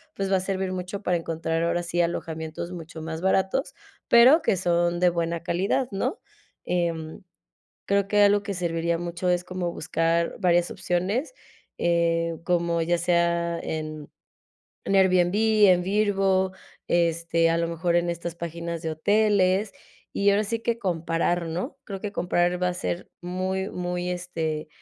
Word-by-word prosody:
pues 195 0 -2
va 190 - +4
a - - 0
servir 190 0 -2
mucho 185 +2 -5
para 180 - +1
encontrar 165 0 -2
ahora 170 +1 0
sí 175 0 0
alojamientos 160 0 -3
mucho 165 -2 -8
más 160 0 -5
baratos, 190 - +1 0.3
pero 255 +8 +7
que 195 - +1
son 175 -1 +1
de 180 - +5
buena 170 0 -2
calidad, 190 +9 0
¿no? 250 - -2 0.4
Em, 165 -3 -2 0.7
creo 200 0 +2
que 205 +1 +3
algo 205 0 +4
que 200 -1 -3
serviría 170 -1 -1
mucho 175 +1 -3
es 175 0 +1
como 180 -1 -4
buscar 165 +1 0
varias 175 -2 +2
opciones, 195 - -2 0.4
eh, 170 -1 +1
como 170 -1 +1
ya 175 +1 +1
sea 170 0 +1
en 155 -1 -5 0.8
Airbnb, 185 -1 +3 0.3
en 180 -1 +4
Vrbo, 195 -1 +1 0.4
este, 170 -1 +2
a 165 - +1
lo 170 - 0
mejor 170 +1 0
en 175 0 +2
estas 170 0 -4
páginas 170 0 -5
de 160 - -3
hoteles, 200 +3 +2 0.4
y 200 0 +2
ahora 205 +2 +2
sí 230 +2 -2
que 230 0 -1
comparar, 170 -2 0
¿no? 180 - -4
Creo 195 -2 -6
que 210 - -4
comparar 175 -1 0
va 180 - +2
a 180 - -2
ser 175 0 -4
muy, 185 +2 -2
muy, 180 0 -3
este, 165 -4 -3
175 Hz, 155 wpm, -25 LUFS, 170-190 Hz, 0.8 s, pero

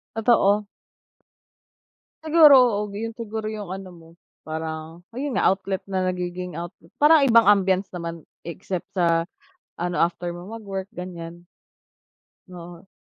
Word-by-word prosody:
Totoo. 210 -3 +3 1.6
Siguro, 315 -2 +7
oo, 210 -5 +2
ga 200 - -7
'yun 225 +1 -5
siguro 220 -2 -5
'yung 210 -3 -6
ano 190 0 -7
mo, 165 -1 -16 0.3
parang 160 +2 -6
ayun 270 +1 -3
nga, - - +2
outlet 190 0 -5
na 190 -1 -2
nagiging 180 -1 -5
outlet. 170 -1 -9
Parang 300 +1 +6
ibang 230 -5 +5
ambiance 195 -1 +3
naman 170 -2 -6 0.2
except 180 +1 -5
sa 170 -2 +2 0.6
ano, 175 0 -2
after 175 +1 -1
mo 175 +3 -10
magwork, 200 -4 -6
ganiyan, 175 -2 -8 1.0
oo. 175 0 -11
185 Hz, 130 wpm, -23 LUFS, 175-215 Hz, 1.6 s, Siguro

